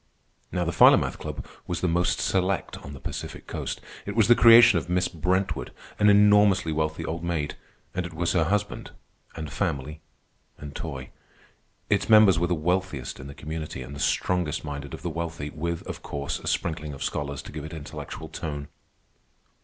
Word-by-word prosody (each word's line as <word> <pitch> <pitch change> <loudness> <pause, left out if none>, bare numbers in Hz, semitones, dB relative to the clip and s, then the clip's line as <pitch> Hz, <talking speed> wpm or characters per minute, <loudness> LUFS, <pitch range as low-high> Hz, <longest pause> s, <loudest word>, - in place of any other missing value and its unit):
Now 90 -1 0
the 85 - 0
Philomath - - +5
Club - - -6 0.2
was - - -3
the 90 - +1
most 90 +1 +1
select 95 -2 0
on 70 - -9
the 70 - -9
Pacific - - -6
Coast. - - -4 0.2
It - - -5
was 110 -2 +4
the 120 - +8
creation 115 -5 +8
of 85 - -9
Miss 90 0 +2
Brentwood, 90 +3 -1 0.3
an 105 0 +6
enormously 105 -4 +5
wealthy 80 0 -1
old 85 +1 -4
maid; 80 -4 -1 0.4
and 90 - -1
it 85 -1 -7
was 85 +1 0
her 85 -4 +3
husband, 100 +4 -1 0.5
and 80 -3 -6
family, 75 +3 -2 0.6
and 75 -1 -9
toy. 65 -5 -6 0.8
Its 100 +1 +1
members 105 -5 +7
were 85 - +1
the 90 - +1
wealthiest 90 -4 -2
in 65 - -8
the 70 - -9
community, 80 -3 -5
and 70 +3 -9
the - - -8
strongest 90 -1 0
minded 70 -2 -5
of - - -13
the 85 - -1
wealthy, 85 -2 -4
with, 85 +2 -3
of - - -6
course, 70 -1 -4
a - - -9
sprinkling 75 -3 -2
of 70 - -6
scholars 70 -1 -3
to - - -10
give 75 -1 -6
it 80 - -7
intellectual 80 -3 -7
tone. 75 -2 -5
80 Hz, 185 wpm, -26 LUFS, 75-90 Hz, 0.8 s, the